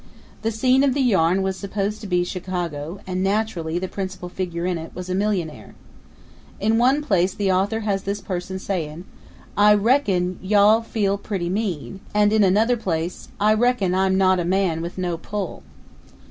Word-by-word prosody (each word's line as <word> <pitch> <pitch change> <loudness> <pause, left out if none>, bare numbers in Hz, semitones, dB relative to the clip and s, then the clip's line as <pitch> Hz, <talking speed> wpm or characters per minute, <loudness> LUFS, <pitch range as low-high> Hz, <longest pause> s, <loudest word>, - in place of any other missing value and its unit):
The 225 - 0
scene 255 +4 +3
of 270 -2 +2
the - - 0
yarn 190 -6 +3
was 190 0 -2
supposed 200 +1 -3
to 210 - -6
be 180 -1 +2
Chicago 175 -2 -4
and 185 0 -2
naturally 195 -5 -1
the 185 +1 -2
principal 185 -2 -5
figure 175 -2 -4
in 180 -2 -1
it 160 - -9
was 180 0 -5
a - - 0
millionaire. 190 -5 -2 0.8
In 220 +2 +2
one 265 +5 +3
place 190 - +1
the 200 -2 +1
author 200 +4 +1
has 200 -2 -1
this 200 +2 -3
person 190 -1 -4
saying, 175 -3 -4 0.5
"I 210 +1 +6
reckon 200 -6 +1
you'll 210 +3 +4
feel 200 -3 -1
pretty 190 -4 -3
mean," 195 -3 -3 0.2
and 210 0 +4
in 215 -1 +4
another 215 +6 +3
place, 170 -4 -3
"I 215 +1 +4
reckon 220 -5 +2
I'm 190 0 +2
not 185 -1 +4
a - - 0
man 180 -2 +1
with 170 +2 -6
no 175 -3 -2
pull." 200 0 -5
190 Hz, 175 wpm, -22 LUFS, 180-210 Hz, 0.8 s, I